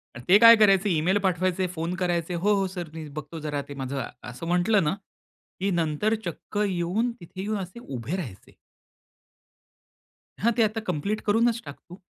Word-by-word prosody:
आणि 120 - -9
ते 195 - +9
काय 230 0 +10
करायचे 200 -2 +4
ईमेल 175 +4 +2
पाठवायचे, 185 -1 0
फोन 165 +2 -2
करायचे, 175 -1 -1
"हो, 200 +5 +2
हो, 195 -1 +1
सर 175 -4 -5
मी 160 -2 -7
बघतो, 155 +2 -7
जरा 145 -2 -3
ते 145 - -6
माझं" 135 0 -3 0.3
असं 125 +7 -7
म्हटलं 180 +3 +3
ना, 150 +4 +1 0.7
की 195 - 0
नंतर 170 +6 +1
चक्क 175 +4 -6
येऊन 190 +6 0
तिथे 180 +2 -8
येऊन 210 +2 -2
असे 190 +4 -7
उभे 135 - -5
राहायचे. 115 - -8 1.9
हां, 235 +3 +3
ते - - +6
आता 220 +1 -5
कंप्लीट 200 +9 -2
करूनच 230 +2 +3
टाक 145 - -8
तू. 180 - -11
180 Hz, 175 wpm, -26 LUFS, 155-205 Hz, 1.9 s, काय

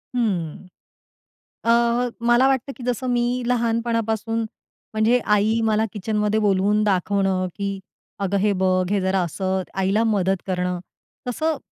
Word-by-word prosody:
हं, 190 -8 -1 1.0
अ, 230 - +2 0.6
मला 240 +2 +5
वाटतं, 270 0 0
की 255 - -11
जसं 250 +1 -1
मी 240 -1 +2 0.2
लहानपणापासून 230 -2 0 0.5
म्हणजे 220 +3 +3 0.2
आई 220 +3 +2
मला 220 0 +2
किचनमध्ये 210 +1 0
बोलवून 205 +1 +2
दाखवणं, 195 -1 +1
की 200 -1 -3 0.4
"अगं! 200 0 -1
हे 205 +1 +2
बघ 185 -1 +2
हे 205 -1 +2
जरा." 190 0 +1
असं 190 +3 -2 0.2
आईला 195 +4 +2
मदत 195 -4 +1
करणं 180 -1 -1 0.5
तसं 310 +6 0
210 Hz, 130 wpm, -22 LUFS, 190-230 Hz, 1.0 s, मला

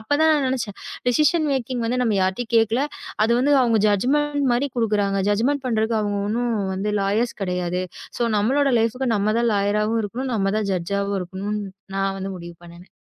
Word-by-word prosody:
அப்பத் 290 +7 0
தான் 320 - +5
நான் 285 -3 +2
நினைச்சேன். 230 -6 -3 0.3
டிசிஷன் 305 +4 +3
மேக்கிங் 255 -2 -2
வந்து 250 +2 0
நம்ம 225 -4 +1
யார்ட்டயும் 190 +6 -2
கேக்கல. 225 +5 +3 0.4
அது 225 - +1
வந்து 285 +3 +3
அவுங்க 230 -3 +2
ஜட்ஜ்மெண்ட் 285 +7 +1
மாரி 255 +4 +1
குடுக்குறாங்க. 205 -4 +1
ஜட்ஜ்மெண்ட் 260 +7 +1
பண்றதுக்கு 220 -1 +1
அவுங்க 205 -1 -1
ஒண்ணும் 210 -4 -1 0.2
லாயர்ஸ் 215 +5 0
கிடையாது 180 -1 -1 0.4
ஸோ 240 - 0
நம்மளோட 270 +7 +2
லைஃப்க்கு 230 +2 0
நம்ம 210 +1 +1
தான் 235 -1 +2
லாயராவும் 210 +3 +1
இருக்கணும். 245 +5 -4
நம்ம 195 -2 +1
தான் 210 - -2
ஜட்ஜாவும் 200 +3 -1
இருக்கணுன், 195 +4 -4 0.4
நான் 195 0 0
வந்து 195 0 -4
முடிவு 170 0 -9
பண்ணுனேன். 170 +1 -14
220 Hz, 170 wpm, -22 LUFS, 200-250 Hz, 0.4 s, தான்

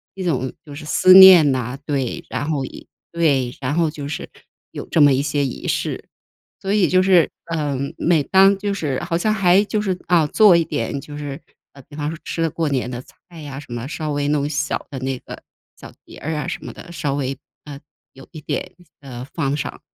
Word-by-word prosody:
一 190 - -5
种 130 -7 -1
就 145 - -11
是 150 +2 -9
思 185 +4 +5
念 185 -6 +9
哪， 125 0 -3
对。 135 -5 -3
然 145 - -4
后 140 -4 -1
以 - - -11 0.2
对， 140 -7 +1
然 135 +2 -2
后 165 -2 +1
就 145 -2 -7
是 150 - -5 0.4
有 - - -7
这 - - 0
么 145 -2 +6
一 130 - +1
些 145 0 -1
仪 130 - -6
式。 - - -2 0.5
所 195 +1 -2
以 205 -4 +3
就 185 0 +3
是， 185 -3 +4 0.2
嗯， 140 -3 -2
每 165 -3 +2
当 195 +6 +4
就 200 +1 -2
是 145 -9 -2
好 175 -1 -2
像 215 +4 +1
还 195 -2 +4
就 215 - -1
是 195 -3 -1
啊， 170 -3 +4
做 190 +3 +5
一 165 - +1
点 140 - -3
就 145 - -10
是 145 -1 -6 0.3
呃， 140 - -14
比 145 - -15
方 150 0 -3
说 165 - -6
吃 165 - -4
了 165 - +1
过 160 +1 -2
年 130 -3 -1
的 125 0 -6
菜 170 +3 -16
呀， 140 -2 -7
什 145 - -13
么 120 0 -5
稍 155 0 -4
微 145 0 -1
弄 145 -1 0
小 145 -1 -2
的 140 - -7
那 130 0 -3
个 - - -11 0.4
小 - - -12
碟 - - -13
儿 160 +3 -4
啊 150 +1 -3
什 175 - -5
么 - - -7
的。 175 - -12
稍 150 -5 -2
微， 135 -1 -3 0.3
呃， 145 -2 -9 0.3
有 135 - -14
一 155 - -10
点 180 - -4 0.3
呃， 125 -3 -8
放 140 -4 0
上， 145 - -5
150 Hz, 240 characters per minute, -20 LUFS, 140-175 Hz, 0.5 s, 念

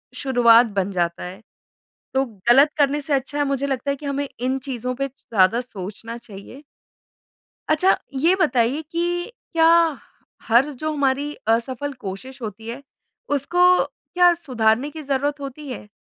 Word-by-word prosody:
शुरुआत 240 -3 +5
बन 195 +1 -1
जाता 170 -2 -1
है। 185 +4 -8 0.7
तो 265 0 +2 0.2
गलत 275 +5 +7
करने 290 0 +2
से 290 +1 -1
अच्छा 275 +2 -1
है, 290 - +2
मुझे 275 0 -1
लगता 270 0 -2
है - - -1
कि 295 - -10
हमें 280 0 -2
इन 255 +2 0
चीज़ों 255 -2 -4
पे 275 +2 -2
ज़्यादा 230 -4 +1
सोचना 225 0 -8
चाहिए। 230 +5 -12 1.1
अच्छा, 310 +5 +4 0.2
ये 325 +8 +3
बताइए 255 -1 +2
कि 350 +4 -2 0.2
क्या 325 -1 +4 0.8
हर 240 +6 +4
जो 310 +4 -4
हमारी 285 +1 0
असफल 255 +5 0
कोशिश 250 +7 -7
होती 220 0 -7
है, 240 +4 -6 0.5
उसको 290 +5 -1 0.3
क्या 355 -1 +2
सुधारने 245 -4 +1
की 310 +1 -8
ज़रूरत 285 +1 -1
होती 280 +2 -8
है? 210 - -8
265 Hz, 150 wpm, -22 LUFS, 230-290 Hz, 1.1 s, गलत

